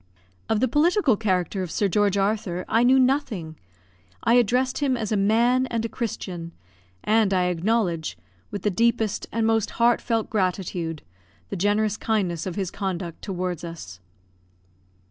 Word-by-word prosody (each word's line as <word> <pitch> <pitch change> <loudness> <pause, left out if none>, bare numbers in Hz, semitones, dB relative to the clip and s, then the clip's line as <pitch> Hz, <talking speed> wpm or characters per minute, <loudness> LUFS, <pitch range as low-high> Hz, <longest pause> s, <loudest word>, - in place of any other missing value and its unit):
Of 220 0 +1
the 260 - +3
political 310 - +3
character 190 -3 -1
of 180 - -4
Sir 205 - 0
George 200 +1 +2
Arthur 195 -3 -1
I 225 - +3
knew 255 +2 +5
nothing. 250 - 0 0.7
I 230 - +3
addressed 250 +2 +2
him 270 -3 +1
as 220 -3 -3
a - - +2
man 235 +6 +3
and 230 -2 -2
a - - -3
Christian, 180 -8 -5 0.5
and 215 -2 +3
I 180 -1 +2
acknowledge, 175 - 0 0.3
with 205 -3 -6
the 210 - +2
deepest 230 +1 +1
and 225 0 0
most 225 -2 +2
heartfelt 235 -1 +2
gratitude, 180 -5 -2 0.5
the - - -2
generous 205 +3 +1
kindness 190 -7 -1
of 180 - -4
his 195 -3 -2
conduct 180 -4 -4
towards 180 -3 -3
us. 155 - -8
205 Hz, 150 wpm, -24 LUFS, 180-230 Hz, 0.7 s, knew